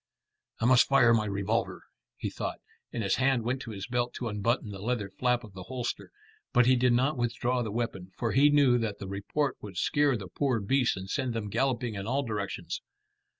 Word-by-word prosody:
"I - - 0
must 125 0 +6
fire 125 -4 +5
my 110 -2 +2
revolver," 100 +3 -1 0.3
he - - -3
thought, - - -4 0.3
and 115 - -3
his 100 - +1
hand 130 -2 +2
went 125 +3 -1
to 125 - -7
his 100 -3 -5
belt 120 0 -1
to 120 - -3
unbutton 105 +2 -1
the 95 -1 -8
leather 110 -3 -2
flap 125 +4 0
of 105 -3 -12
the 95 - -8
holster; 125 -2 -4 0.4
but 125 -2 +5
he 130 +1 +5
did 125 0 +3
not 130 +3 +1
withdraw 120 +1 0
the 110 - -2
weapon, 100 -5 -3
for 115 -2 -1
he 145 +2 +5
knew 140 -4 +5
that 110 -3 -2
the 100 - -7
report 100 +9 -2
would 100 -4 -9
scare 145 - +2
the 100 -3 -7
poor 130 -1 0
beasts 125 +3 +1
and 95 0 -6
send 130 -4 -1
them 105 -2 -3
galloping 120 0 0
in 100 0 -5
all 135 +4 +1
directions. 105 -5 -4
120 Hz, 210 wpm, -29 LUFS, 105-130 Hz, 0.4 s, must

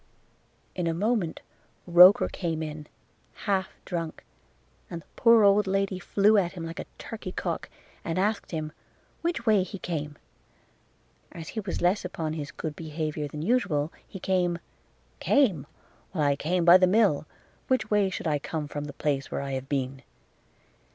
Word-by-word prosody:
– - - -39
In 180 -2 -1
a 165 - 0
moment 205 -2 0 0.4
Roker 180 +3 +8
came 165 -3 -3
in, 150 -1 -7 0.6
half 190 -3 +1 0.2
drunk, 165 -3 -4 0.6
and 170 -2 -6
the - - -34
poor 230 -2 +6
old 200 0 +5
lady 195 -1 0
flew 205 +3 +4
at 175 -3 -1
him 170 -3 -6
like 165 0 -7
a - - -6
turkey 215 -5 -7
cock, 175 -2 -3 0.3
and 165 +1 -2
asked 205 +3 0
him, 155 -2 -4 0.5
which 335 -8 -2
way 215 -4 +5
he 195 +2 -5
came? 150 -5 -4 1.1
As 165 -2 -8
he 225 - -4
was 195 -3 -4
less 180 +4 +2
upon 160 -4 -3
his 150 -3 -5
good 155 0 -5
behaviour 155 -1 -3
than 150 +1 -6
usual, 175 -9 +1
he 190 - -9
came, 180 -2 +1 0.6
'Came! 210 - +2 0.5
Why 150 -5 +2
I - - +1
came 170 +4 0
by 175 +1 +9
the 185 - +5
mill; 185 -7 +3 0.4
which 255 -4 0
way 205 -2 +3
should 185 - -5
I 150 -2 +1
come 150 +1 -4
from 145 0 -5
the 145 - -7
place 140 -2 -1
where - - -3
I 140 0 -4
have 130 0 -4
been?' 135 -1 -2
175 Hz, 170 wpm, -27 LUFS, 155-195 Hz, 1.1 s, by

